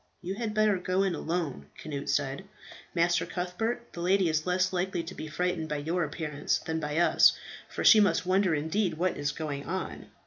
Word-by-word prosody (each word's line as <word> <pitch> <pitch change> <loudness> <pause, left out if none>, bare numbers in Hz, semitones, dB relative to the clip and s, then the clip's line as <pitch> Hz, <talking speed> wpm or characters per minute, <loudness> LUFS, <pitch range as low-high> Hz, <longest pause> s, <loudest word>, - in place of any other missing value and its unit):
"You 180 +2 -3
had 215 0 -4
better 215 -3 +3
go 185 +2 +1
in 190 -2 +1
alone," 160 - -3
Cnut 140 -2 -5
said, 140 +5 -1 0.5
"Master 175 +1 +2
Cuthbert. 225 +7 -3
The 170 - -6
lady 185 0 +3
is 155 +1 -1
less 185 +1 +1
likely 180 -1 -1
to 170 +3 -7
be 155 - -7
frightened 170 0 -2
by 150 - -1
your 165 +5 -1
appearance 150 -1 -2
than 160 0 -3
by 150 0 -3
us, 175 - +5 0.3
for - - -4
she 220 - +8
must 185 -4 +3
wonder 185 -2 +2
indeed 160 +5 0
what 180 +3 0
is 145 0 -1
going 145 -1 -5
on." 185 +2 -4
175 Hz, 195 wpm, -29 LUFS, 155-185 Hz, 0.5 s, she